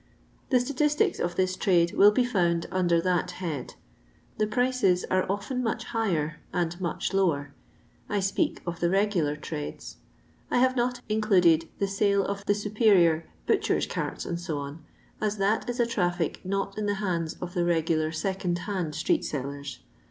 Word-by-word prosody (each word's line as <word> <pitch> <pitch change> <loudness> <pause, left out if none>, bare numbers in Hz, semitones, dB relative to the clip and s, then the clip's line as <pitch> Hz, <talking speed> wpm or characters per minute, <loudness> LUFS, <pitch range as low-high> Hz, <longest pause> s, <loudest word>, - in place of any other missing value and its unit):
The 255 - +4
statistics 295 - +1
of 175 0 -1
this 185 0 +1
trade 170 -3 +2
will 205 - +7
be 245 +4 +2
found 175 -7 +1
under 175 -2 +2
that 180 0 +1
head; 160 -8 -4 0.6
the 215 - +2
prices 245 -6 +2
are 185 0 +2
ofttm 205 +6 -2
much 225 -2 -1
higher 170 -10 -1
and 175 +1 -2
much 175 +2 -2
lower. 145 -8 +1 0.6
I 205 - +1
speak 195 0 0
of 170 -1 -4
the 170 - +2
regular 190 -6 +1
trades. 150 0 -6 0.5
I - - +1
have 255 +1 +3
not 245 0 0
included 180 -7 +3
the 200 - +1
sale 200 0 +2
of 200 0 -3
the 205 - +3
superior 200 -6 +3 0.2
butchers' - - +1
carts, - - -4 0.2
&c., 170 -3 -3 0.7
as 215 0 0
that 205 +5 +1
is 245 +1 -3
a 240 - +4
traffic 175 -7 -1
not 195 +2 -2
in 210 - -1
the 205 - +1
hands 175 -5 -2
of 175 0 -6
the 175 - +1
regular 160 -2 +1
second 180 +1 -1
hand 180 -7 -2
street 160 - +1
sellers. 140 0 -5
185 Hz, 160 wpm, -27 LUFS, 170-210 Hz, 0.7 s, will